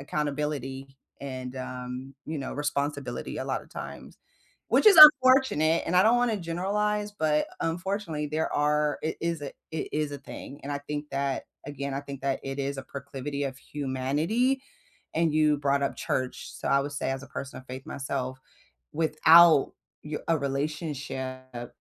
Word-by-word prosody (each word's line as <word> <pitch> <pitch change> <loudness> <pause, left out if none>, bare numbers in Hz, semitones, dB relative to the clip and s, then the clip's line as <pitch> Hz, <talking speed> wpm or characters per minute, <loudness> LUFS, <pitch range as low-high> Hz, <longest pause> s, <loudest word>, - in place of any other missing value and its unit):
accountability 140 -2 -3 0.2
and, 130 -2 -6
um, 130 +1 -6
you 160 - -3
know, 135 - -4
responsibility 145 -3 -3
a - - -3
lotta - - -3
times. - - -9 0.5
Which, - - +3
is 400 -5 +9
unfortunate, 260 - +8
and 180 - -1
I 185 - +7
don't 225 +4 +5
wanna 240 -2 +2
generalize, 205 +4 -1
but, 155 -5 +1
unfortunately, 170 -2 -2
there 155 +2 -2
are 150 0 +1
it 155 - -2
is 170 -2 -1
a 140 - -5 0.2
it 160 - -3
is 150 -1 -1
a 140 - -5
thing, 140 +1 -10
and 145 - -3
I 140 - -2
think 145 +1 -6
that 140 -1 -1 0.2
again, 140 -1 -4
I 135 - -2
think 140 -2 -9
that 135 -1 -1
it 135 0 -5
is 140 0 -2
a - - -4
proclivity 140 +1 -5
of 135 -1 -4
humanity, 150 - -1 0.5
and 165 0 +2
you 150 -1 +3
brought 140 0 +1
up 140 - 0
church, 130 -1 -3
so - - -5
I 140 - +4
would 145 +1 -4
say 140 - -2
as 135 0 -3
a - - -10
person 140 0 -7
of 130 - -14
faith 130 +1 -8
myself, 130 -1 -4 0.5
without 160 0 +6 0.3
y 150 0 -4
a 165 -1 +3
relationship 135 -3 -4
145 Hz, 165 wpm, -27 LUFS, 135-160 Hz, 0.5 s, is